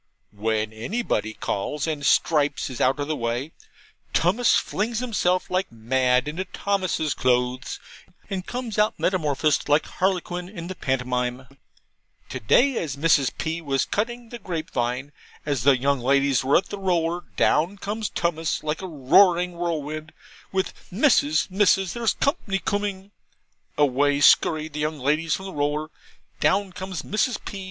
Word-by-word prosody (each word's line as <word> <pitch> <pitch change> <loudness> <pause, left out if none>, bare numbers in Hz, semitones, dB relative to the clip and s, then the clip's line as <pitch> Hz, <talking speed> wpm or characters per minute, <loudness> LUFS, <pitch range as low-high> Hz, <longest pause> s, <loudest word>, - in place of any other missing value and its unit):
When 110 +1 -1
anybody 110 - -2
calls, 140 +9 -2
and 155 -3 -3
Stripes 145 -2 +2
is 125 - -5
out 130 +2 +2
of 145 - -2
the 155 - -1
way, 120 +4 -2 0.6
Tummus 210 +8 +3
flings 225 +3 -1
himself 205 -8 0
like 185 +1 0
mad 125 +3 +1
into 160 +5 -3
Thomas's 185 -9 -1
clothes, 125 0 0 0.5
and 190 -3 -3
comes 240 -4 -4
out 210 +1 +2
metamorphosed 155 -5 +1
like 145 +1 +4
Harlequin 180 -1 -2
in 175 -4 -8
the 185 - -5
pantomime. 125 -3 -2 0.8
To - - -5
day, 255 - +3
as 145 -6 -3
Mrs. 140 -2 +3
P. 165 +1 -3
was 135 -4 0
cutting 235 +2 -3
the 240 - -8
grapevine, 140 - -3 0.3
as 140 -5 -1
the 135 +1 +5
young 140 +1 +1
ladies 135 +2 +2
were 135 +2 +4
at 185 - -2
the 205 - -6
roller, 175 -2 0
down 180 +6 +2
comes 210 +2 -3
Tummus 165 -2 -1
like 155 +2 -2
a 190 - -5
roaring 175 +4 +4
whirlwind, 155 -3 -4 0.4
with 190 0 -1 0.2
'Missus, 180 - +3
Missus, 195 -1 +3
there's 235 -2 0
company 275 - 0
coomin'!' 200 0 -3 0.7
Away 145 0 +3
skurry 155 +1 +4
the 150 -1 -7
young 155 +1 -1
ladies 150 +4 +1
from 190 - -7
the 190 - -7
roller, 150 +2 -1 0.5
down 195 -1 +1
comes 185 -3 -5
Mrs. 220 +4 0
P. 200 - -6
160 Hz, 150 wpm, -24 LUFS, 140-190 Hz, 0.8 s, the